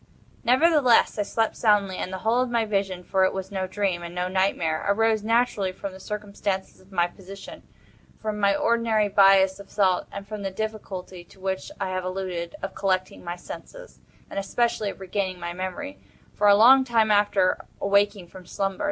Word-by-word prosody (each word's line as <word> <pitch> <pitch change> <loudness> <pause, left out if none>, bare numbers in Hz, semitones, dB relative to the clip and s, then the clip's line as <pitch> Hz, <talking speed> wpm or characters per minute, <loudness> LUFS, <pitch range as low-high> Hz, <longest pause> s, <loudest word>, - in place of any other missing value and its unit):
Nevertheless, 255 -3 +4
I - - +3
slept 225 +2 -1
soundly, 205 -4 +2
and 185 - -4
the 190 - -4
whole 225 +5 +1
of 255 - -1
my 235 -2 +1
vision—for 195 -2 0
it 185 - +2
was 190 0 -5
no 190 -1 -2
dream, 190 -2 -1
and 170 0 -8
no 180 0 -1
nightmare—arose 195 +4 +1
naturally 220 -3 +1
from 195 +1 -7
the 190 - -11
circumstances 200 -1 -4
of 185 +1 -22
my 175 -2 +2
position—from 195 +3 -10
my 200 -1 +3
ordinary 225 -1 +1
bias 195 -1 +5
of 200 - -12
thought—and 195 0 0
from 215 -1 -6
the 195 - -2
difficulty, 190 -3 -6
to 190 - -20
which 190 +3 -3
I 195 -2 -2
have 185 0 -2
alluded, 185 -2 -4
of 195 - -4
collecting 185 -1 -1
my 175 0 -4
senses, - - -11 0.3
and - - -4
especially 225 +1 0
of 195 - -9
regaining 190 -1 -3
my 170 0 -5
memory, 185 +11 -5 0.3
for 210 - +2
a 200 - +8
long 255 +6 +7
time 225 -4 +2
after 205 -2 +2 0.2
awaking 200 -1 +2
from 185 -2 -13
slumber. 195 -1 -2
195 Hz, 175 wpm, -25 LUFS, 185-215 Hz, 0.3 s, a